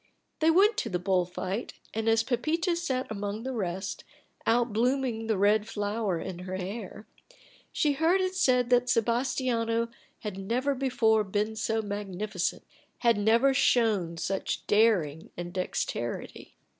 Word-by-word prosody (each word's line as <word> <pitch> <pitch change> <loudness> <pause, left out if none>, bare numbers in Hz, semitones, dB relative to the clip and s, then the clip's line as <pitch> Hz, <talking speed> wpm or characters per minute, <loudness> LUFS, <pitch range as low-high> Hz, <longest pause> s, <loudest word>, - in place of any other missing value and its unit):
They 320 - +4
went 400 +6 +5
to - - -1
the 180 - 0
bull 180 0 +1
fight; 185 +5 -4 0.2
and, 225 +1 0
as 225 0 +4
Pepita 315 +9 0
sat 265 -7 -1
among 205 +1 -4
the 265 +1 -3
rest, 190 -3 -3 0.4
out 235 -1 +2
blooming 240 -1 0
the 220 -3 +1
red 210 +2 +3
flower 205 -4 -1
in 180 0 -6
her 185 +1 -5
hair, 195 +3 -6 0.7
she 300 - +2
heard 325 +6 +2
it 370 0 0
said 250 -9 +2
that 245 0 +4
Sebastiano 235 -1 +1 0.3
had 205 -3 -5
never 250 +8 0
before 245 -5 +2
been 210 +2 -1
so 220 +1 -1
magnificent, 205 -2 -3 0.4
had 235 -2 +4
never 230 +6 +4
shown 210 -10 +2
such 190 +3 -2
daring 195 -8 +2
and 175 0 -5
dexterity. 120 -10 -4
220 Hz, 145 wpm, -28 LUFS, 195-250 Hz, 0.7 s, went